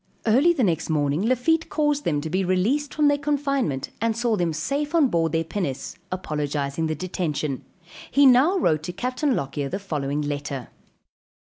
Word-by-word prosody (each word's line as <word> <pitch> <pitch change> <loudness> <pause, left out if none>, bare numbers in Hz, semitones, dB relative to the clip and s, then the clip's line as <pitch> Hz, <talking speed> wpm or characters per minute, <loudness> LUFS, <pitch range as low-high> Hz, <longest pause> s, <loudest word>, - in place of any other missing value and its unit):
Early 260 +10 +5
the 300 -7 +1
next 165 -5 0
morning 145 0 +1
Lafitte 255 +9 +1
caused 295 -1 0
them 145 -3 +1
to 160 - -4
be 190 +2 +1
released 215 +11 +1
from 300 -1 +2
their 285 0 +3
confinement 275 - -1
and 225 -1 0
saw 235 -1 +1
them 175 -4 0
safe 280 - -2
on 300 -6 +4
board 165 -4 +1
their 165 0 +1
pinnace, 165 -6 -4 0.2
apologizing 150 -3 -2
the 155 - -1
detention. 155 -5 -3 0.5
He 285 0 +4
now 270 +9 +6
wrote 155 - +2
to 180 - -4
Capt. 250 - -4
Lockyer 145 - 0
the 190 - -2
following 150 -7 -2
letter. 145 -3 -4
185 Hz, 170 wpm, -24 LUFS, -, 0.5 s, now